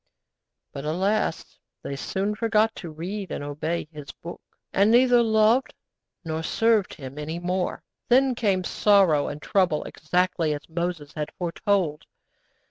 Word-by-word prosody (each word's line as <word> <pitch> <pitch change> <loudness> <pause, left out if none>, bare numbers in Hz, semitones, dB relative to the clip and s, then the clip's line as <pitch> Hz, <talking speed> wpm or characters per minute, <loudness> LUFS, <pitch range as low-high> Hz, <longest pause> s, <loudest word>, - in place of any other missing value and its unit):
But, 140 - -6
alas! 190 +8 -1 0.2
they 140 - -4
soon 195 +8 -2
forgot 225 0 +2
to 170 - -7
read 180 +5 -5
and - - -4
obey 150 +3 -3
His 150 -3 -9
Book, 170 - -10 0.3
and 200 +2 +4
neither 245 +1 +5
loved 220 +3 +3 0.5
nor 160 0 -2
served 220 +3 +1
Him 135 0 -9
any 155 +3 -4
more. 180 +1 -2 0.3
Then 260 +1 +5
came 200 -6 +1
sorrow 185 -7 +3
and 145 - -5
trouble 175 -2 +1
exactly 170 -1 0
as 145 - -10
Moses 170 -3 -3
had 150 -1 -4
foretold. 175 -2 -1
180 Hz, 135 wpm, -25 LUFS, 155-210 Hz, 0.5 s, neither